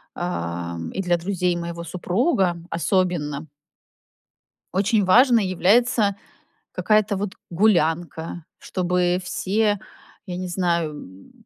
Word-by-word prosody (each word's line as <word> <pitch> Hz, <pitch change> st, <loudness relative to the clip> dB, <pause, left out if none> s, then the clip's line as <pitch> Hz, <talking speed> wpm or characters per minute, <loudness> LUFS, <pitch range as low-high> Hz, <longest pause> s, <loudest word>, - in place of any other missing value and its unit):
а, 85 Hz, -, -3 dB, 0.2 s
и 195 Hz, -, -2 dB
для 175 Hz, -2 st, +1 dB
друзей 180 Hz, 0 st, -1 dB
моего 170 Hz, 0 st, -5 dB
супруга- 180 Hz, -, 0 dB
особенно 165 Hz, -4 st, -1 dB, 1.3 s
очень 205 Hz, +1 st, +2 dB
важной 230 Hz, +1 st, +5 dB
является 200 Hz, +3 st, +3 dB, 0.6 s
какая-то 215 Hz, -1 st, +2 dB
вот 195 Hz, 0 st, -3 dB, 0.2 s
гулянка, 170 Hz, -3 st, +1 dB
чтобы 180 Hz, -1 st, 0 dB
все, 205 Hz, +3 st, 0 dB, 0.5 s
я 180 Hz, -3 st, -5 dB
не 185 Hz, -, -4 dB
знаю, 175 Hz, -3 st, 0 dB
м, 95 Hz, -10 st, -12 dB
180 Hz, 100 wpm, -23 LUFS, 170-200 Hz, 1.3 s, важной